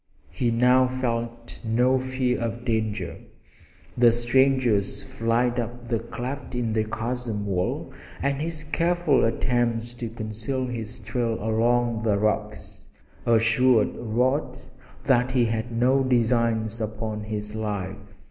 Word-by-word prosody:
He 120 - 0
now 125 +2 +4
felt 120 -2 -3
no 125 +3 +3
fear 130 -1 -1
of 115 +1 -3
danger. 110 -5 -1 0.8
The 120 -1 +6
stranger's 120 -3 +2
flight 120 +2 0
up 120 +1 -5
the 115 -2 +1
cleft 125 +4 -6
in 120 -2 -1
the 110 0 +1
chasm 115 -1 -3
wall 90 -2 -2 0.3
and 140 +1 -1
his 160 -1 -3
careful 170 -1 +2
attempts 120 0 0
to 120 -1 -5
conceal 115 +3 -3
his 120 -2 -4
trail 115 0 -2
among 115 +1 +1
the 110 -3 +2
rocks 105 +1 -2 0.4
assured 115 +1 +4
Rod 125 +3 0 0.5
that 125 -2 +3
he 130 -2 +2
had 115 +1 -2
no 125 +4 +3
designs 115 -3 +1
upon 110 0 -4
his 105 -1 -4
life. 105 -1 -5
120 Hz, 125 wpm, -25 LUFS, 110-125 Hz, 0.8 s, The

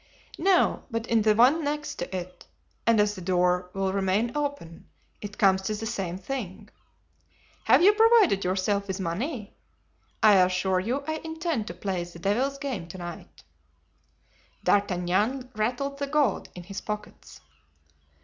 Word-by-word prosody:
"No, 375 +1 +3
but 230 -2 -3
in 230 -2 +2
the 215 0 +3
one 265 +8 +5
next 295 +1 -3
to 175 +2 -4
it, 180 0 -9 0.4
and 230 -2 +5
as 210 0 +3
the 185 - -9
door 180 0 +1
will 195 -1 -1
remain 200 +5 0
open 285 - -4 0.3
it 205 0 -8
comes 190 -2 +4
to 215 +3 -2
the 220 +1 -5
same 195 -6 -3
thing. 195 -2 -6 1.0
Have - - +5
you 410 +3 +7
provided 440 - +5
yourself 200 +2 0
with 190 0 -4
money? 210 - -4 0.7
I 210 -2 +7
assure 185 0 +2
you 245 +9 -2
I 315 0 -1
intend 320 -7 -3
to 175 - -6
play 185 -1 -3
the 175 0 -11
devil's 245 +10 0
game 260 -12 -4
to 185 - -9
night." 175 -1 -9 1.2
D'Artagnan 205 +7 +1
rattled 250 +6 -2
the 280 - -2
gold 295 -1 +1
in 180 - -8
his 195 +2 -7
pockets. 210 0 -7
210 Hz, 150 wpm, -26 LUFS, 185-270 Hz, 1.2 s, you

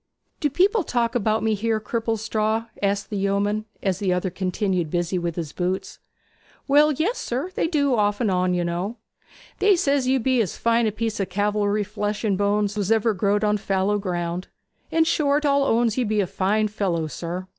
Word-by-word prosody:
Do 295 - +1
people 395 - +3
talk 235 -5 0
about 220 -2 +1
me 220 -1 +2
here, 220 +1 0
Cripplestraw?' 225 0 -1
asked 200 +2 -1
the 205 - -2
yeoman, 200 +2 0 0.2
as 190 -2 0
the 195 -3 0
other 180 +1 0
continued 185 -2 -1
busy 175 +2 -1
with 170 -1 -3
his 165 -4 -4
boots. 185 +1 -3 0.7
'Well, 295 +2 +5
yes, 350 - -1
sir; 265 +10 -3
they - - 0
do 285 -5 +1
off 205 -2 +1
and 220 -5 +1
on, 180 0 +1
you 175 - 0
know. 180 +7 -3 0.6
They 405 -1 +5
says 280 -5 +1
you 265 +1 +3
be 255 0 +2
as 200 - -3
fine 230 0 +2
a - - 0
piece 220 +1 -3
of 195 - -1
calvery 205 +1 0
flesh 210 +1 -3
and 205 -3 +1
bones 205 +1 +1
as - - -9
was 205 0 -1
ever 225 0 +3
growed 205 +2 +1
on 210 0 +2
fallow 195 +1 0
ground; 175 -2 -3 0.4
in 325 - +3
short, 300 -2 +1
all 280 -1 +3
owns 235 -3 +2
that 255 - 0
you - - 0
be 215 0 +1
a 200 - +2
fine 205 +4 0
fellow, 190 -6 -1
sir. 175 +4 -5
210 Hz, 200 wpm, -23 LUFS, 190-235 Hz, 0.7 s, Well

